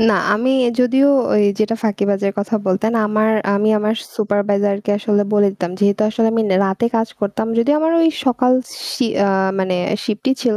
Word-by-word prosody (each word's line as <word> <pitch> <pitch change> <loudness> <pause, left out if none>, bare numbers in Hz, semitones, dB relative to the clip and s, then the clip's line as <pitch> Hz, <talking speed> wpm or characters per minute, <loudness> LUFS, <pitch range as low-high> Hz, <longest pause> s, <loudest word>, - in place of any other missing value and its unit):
না, 205 - +2 0.2
আমি 250 +5 0 0.3
যদিও 265 +3 +3 0.2
ওই 210 - +3 0.2
যেটা 215 +1 0
ফাঁকিবাজের 200 -1 0
কথা 205 +3 -2
বলতেন, 200 +4 0
আমার 215 +1 +1 0.2
আমি 205 +2 +1
আমার 215 +1 0 0.2
সুপারভাইজার 205 -1 0
কে - - -1
আসলে 205 -1 0
বলে 205 -1 +4
দিতাম। 180 -3 -5
যেহেতু 200 0 +1
আসলে 225 +1 0
আমি 225 0 +1
নে 185 - +3
রাতে 195 +4 -1
কাজ 225 0 0
করতাম, 205 +1 -2
যদিও 270 +6 +2
আমার 320 +1 +1
ওই 330 - +4 0.2
সকাল 250 0 +2 0.4
শি 255 - -1 0.2
আ - - +1 0.3
মানে 185 -1 -1 0.3
শিফটই 220 +4 -1
ছিল, 230 -4 +1
210 Hz, 180 wpm, -18 LUFS, 200-230 Hz, 0.4 s, বলে